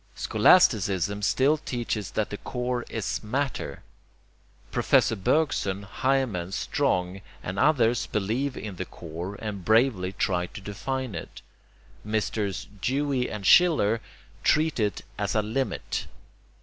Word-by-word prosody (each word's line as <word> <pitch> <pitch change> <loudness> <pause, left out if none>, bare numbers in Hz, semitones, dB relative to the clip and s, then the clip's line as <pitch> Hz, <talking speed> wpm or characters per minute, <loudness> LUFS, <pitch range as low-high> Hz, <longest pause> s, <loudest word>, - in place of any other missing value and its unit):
Scholasticism 100 - +3
still 135 +8 +3
teaches 120 -7 -3
that 110 -1 -2
the 105 - -4
core 125 0 -2
is 105 -3 -3
'matter.' 135 +5 -3 0.9
Professor - - +3
Bergson, 100 -4 0
Heymans, 105 -5 -1
Strong, 95 - 0 0.2
and 95 +2 -4
others, 120 -6 +3
believe 115 +7 -1
in 100 -4 -6
the 95 - -3
core 85 +5 -7
and 100 -3 -5
bravely 110 -3 +3
try 90 -2 0
to - - -9
define 125 +5 -4
it. 80 - -8 0.6
Messrs. 105 -2 -2
Dewey 135 +2 0
and 105 -2 -6
Schiller 115 - +5 0.4
treat 155 -2 +2
it 105 -2 0 0.2
as 100 0 -1
a 110 - +2
'limit.' 120 +5 -2
110 Hz, 120 wpm, -26 LUFS, 100-130 Hz, 0.9 s, Schiller